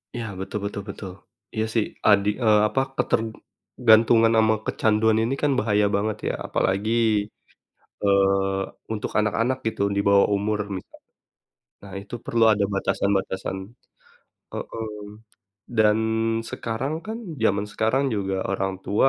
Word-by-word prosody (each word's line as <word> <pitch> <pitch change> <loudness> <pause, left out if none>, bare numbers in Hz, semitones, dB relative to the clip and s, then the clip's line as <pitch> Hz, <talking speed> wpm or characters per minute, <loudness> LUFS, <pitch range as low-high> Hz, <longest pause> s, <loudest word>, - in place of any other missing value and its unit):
Iya, 120 -1 -3
betul 95 +2 -4
betul 100 0 -4
betul. 100 -1 -7 0.4
Iya 110 0 0
sih 115 -3 +2 0.2
adi 100 -1 +5
eee, 105 -2 +5
apa, 135 - -1 0.2
ketergantungan 115 0 +2
sama 110 0 +4
kecanduan 110 0 +2
ini 120 +4 0
kan 145 - +2
bahaya 105 -2 +2
banget 105 +1 -1
ya. - - -2
Apalagi, 100 +4 0 1.1
eee, 95 -1 +2 0.3
untuk 105 -2 -3
anak-anak 115 +4 0
gitu 110 -2 -1
di - - +2
bawah 100 0 +5
umur 105 +1 0 0.2
misa 95 - -11 0.9
nah, 100 - -11
itu 100 - -15
perlu 115 -1 +2
ada 100 -1 0
batasan-batasan. 95 -1 -1 1.0
Heeh. 115 -1 -5 0.9
Dan 110 0 +4 0.5
sekarang 120 +6 -3
kan 220 +1 -4 0.3
zaman 100 -1 +2
sekarang 120 +7 +1
juga 95 -2 -2 0.2
orang 95 0 -1
tua, 105 +6 +3
105 Hz, 125 wpm, -24 LUFS, 100-110 Hz, 1.1 s, adi